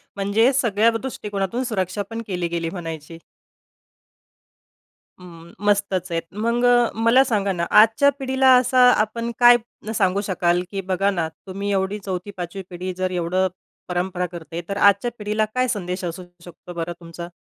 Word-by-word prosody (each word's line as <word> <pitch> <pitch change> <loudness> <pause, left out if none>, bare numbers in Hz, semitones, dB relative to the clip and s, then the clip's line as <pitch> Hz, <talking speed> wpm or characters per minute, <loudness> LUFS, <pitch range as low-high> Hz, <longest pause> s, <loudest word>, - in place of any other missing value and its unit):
म्हणजे 205 +5 +2
सगळ्या 230 -4 +3
दृष्टिकोनातून 210 -2 -3
सुरक्षापण 205 0 -3
केली 180 -3 -2
गेली 170 -1 -3
म्हणायची. 165 -2 -7 2.0
हं, 170 -2 -13
मस्तच 195 -3 +1
आहेत. 165 0 0
मग 235 +3 0 0.4
मला 250 +4 +6
सांगा 205 -6 0
ना, 170 -2 -1
आजच्या 225 +7 +6
पिढीला 265 0 +2
असा 255 +1 +3 0.2
आपण 230 +2 -3
काय 240 0 +8 0.4
सांगू 195 -1 +2
शकाल? 180 -3 +1
की 195 -1 -3
बघा 190 +2 0
ना, 170 -4 -1 0.2
तुम्ही 200 +2 -3
एवढी 195 +2 -1
4थी, 185 +1 -4
5वी 180 +2 -5
पिढी 180 +1 -5
जर 185 0 -1
एवढं 180 +2 0 0.4
परंपरा 180 0 -1
करते. 170 0 -7
तर 200 - -2
आजच्या 200 +4 +4
पिढीला 210 +1 0
काय 255 0 +2
संदेश 185 -5 -3
असू 175 +2 -5 0.2
शकतो 175 +1 -11
बरं 170 0 -4
तुमचा? 170 0 -8
195 Hz, 145 wpm, -22 LUFS, 175-220 Hz, 2.0 s, काय